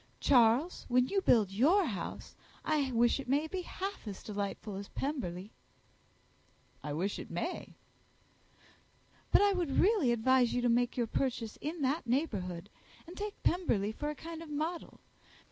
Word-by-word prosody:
Charles, 250 +6 +3
when 250 +1 +3
you 395 -1 +1
build 215 - +4
your 315 - +4
house, 195 - -5 0.3
I 295 -4 +1
wish 240 +2 +3
it 270 - -7
may 285 +4 +2
be 365 +4 -4
half 385 - -6
as 200 - -7
delightful 205 0 -4
as 200 0 -6
Pemberley." 215 - -4 1.3
"I 150 - -5
wish 180 +7 -2
it - - -8
may." - - -4 1.6
"But - - +6
I 405 -1 +4
would 345 -7 -1
really 385 - +4
advise 245 +1 +3
you 245 - +1
to 245 - +3
make 245 +2 +2
your 240 - +2
purchase 235 -2 -2
in 305 +1 -3
that 275 +1 0
neighbourhood, 205 - -2 0.3
and 350 +1 -11
take 415 0 -6
Pemberley 225 - +1
for 295 +7 -4
a 300 - -4
kind 330 +3 -8
of 330 - -9
model. 315 +4 -4
260 Hz, 160 wpm, -32 LUFS, 220-320 Hz, 1.6 s, But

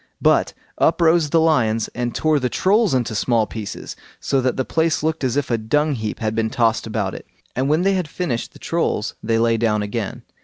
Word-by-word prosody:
But - - +3 0.2
up - - +3
rose 165 -2 +4
the 165 - +3
lions 115 -9 +2
and 120 0 -3
tore 155 -2 +2
the 125 -2 -1
Trolls 200 - +2
into 120 -3 -1
small 115 +1 +1
pieces, 105 0 -7 0.2
so 135 - 0
that 130 0 0
the 130 - 0
place 160 -1 0
looked 160 -1 -1
as 130 +1 0
if 140 -3 -1
a 115 - +1
dung 150 +7 +1
heap 110 -4 -4
had 110 -1 -2
been 110 0 0
tossed 115 -1 +1
about 105 -4 -2
it; - - -9 0.3
and 130 +3 0
when 155 +4 +2
they 195 +1 +3
had 185 -4 -1
finished 150 -8 -3
the - - -14
Trolls 165 -10 -1
they 115 0 0
lay 115 0 +2
down 105 -2 +1
again. 105 0 -4
125 Hz, 220 wpm, -21 LUFS, 110-155 Hz, 0.3 s, rose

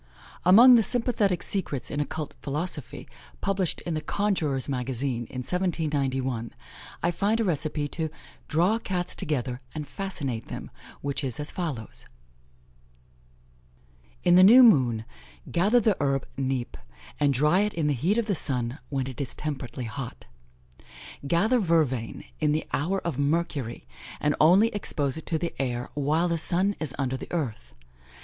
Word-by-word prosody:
Among 230 +8 +8
the 235 - +7
sympathetic 215 -5 +1
secrets 150 - -1
in 145 - -2
occult 150 +1 -3
philosophy, 150 0 -5 0.3
published 195 -3 -1
in 170 - -4
the 155 - -2
Conjurors' 160 -10 0
Magazine, 125 -2 -2
in 130 - -5
1791, 135 -8 -1 0.5
I 175 - +3
find 200 +6 0
a - - +2
recipe 155 -5 -1
"to 160 0 -3 0.4
draw 180 +8 +2
Cats 180 -4 -3
together, 125 -4 -2
and 150 -2 -4
fascinate 140 - -3
them," - - -7 0.3
which 140 0 -2
is 130 -2 -3
as 150 - -2
follows: 150 - -4 2.2
"In 175 - +4
the 185 +1 +8
new 240 +7 +9
moon, 125 - +4 0.5
gather 205 +8 +4
the 215 -3 +2
herb 135 -2 0
Nepe, 130 -2 -2 0.4
and 145 -1 +3
dry 150 +7 +3
it 210 +1 0
in 165 -2 0
the 150 - +2
heat 170 - +1
of 235 - +1
the 210 - 0
sun, 125 -4 -1
when 135 -2 -1
it 130 +1 -6
is 135 - -5
temperately 130 -4 -5
hot: 120 +2 -7 1.0
gather 220 - +3
vervain 155 - 0 0.2
in 150 -1 +2
the 155 - -1
hour 185 +7 0
☿, 145 -4 -1 0.4
and 150 0 +1
only 185 +8 +6
expose 150 - -1
it 160 - -9
to 165 - 0
the 170 +1 -3
air 125 -2 -3
while 155 +5 +1
☉ 175 +4 +1
is 145 -4 -2
under 130 -2 -1
the - - -9
earth. 110 - -4
150 Hz, 150 wpm, -26 LUFS, 135-180 Hz, 2.2 s, new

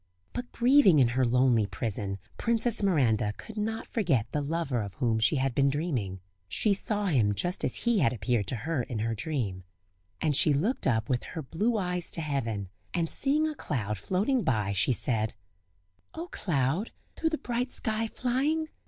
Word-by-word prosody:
But 245 0 -5
grieving 245 - +5
in 130 -4 +5
her 130 +2 +1
lonely 120 -3 +3
prison 100 -1 -2 0.2
Princess 230 -1 +1
Miranda 120 - +2
could 220 - -10
not 220 +1 -2
forget 165 - +1
the 150 - 0
lover 145 -4 -1
of 100 -2 -6
whom 115 -1 +1
she 115 +8 +3
had 135 -1 0
been 140 +2 +3
dreaming; 130 - -2 0.3
she 205 - +2
saw 205 +1 -1
him 115 - +2
just 175 - -2
as - - -1
he 235 -3 +1
had 135 -8 +3
appeared 110 -2 0
to - - 0
her 130 +5 -1
in 120 -1 -5
her 115 +2 -1
dream. 110 - -3 0.6
And 150 -3 +1
she 150 +2 +5
looked 205 - 0
up 110 -3 +1
with 125 -2 0
her 160 -3 -6
blue 210 - 0
eyes 180 -3 -2
to 165 - -2
heaven, 115 - -2 0.3
and 165 -2 0
seeing 300 +3 +1
a 310 - -2
cloud 105 - -3
floating 200 - +1
by, 105 - 0
she 100 - +3
said: 110 -3 0 0.8
"O 335 +2 -5
cloud! 160 - 0 0.3
through 325 - 0
the 315 - -1
bright 245 0 -2
sky 220 0 -1
flying! 280 +7 0
145 Hz, 180 wpm, -29 LUFS, -, 0.8 s, grieving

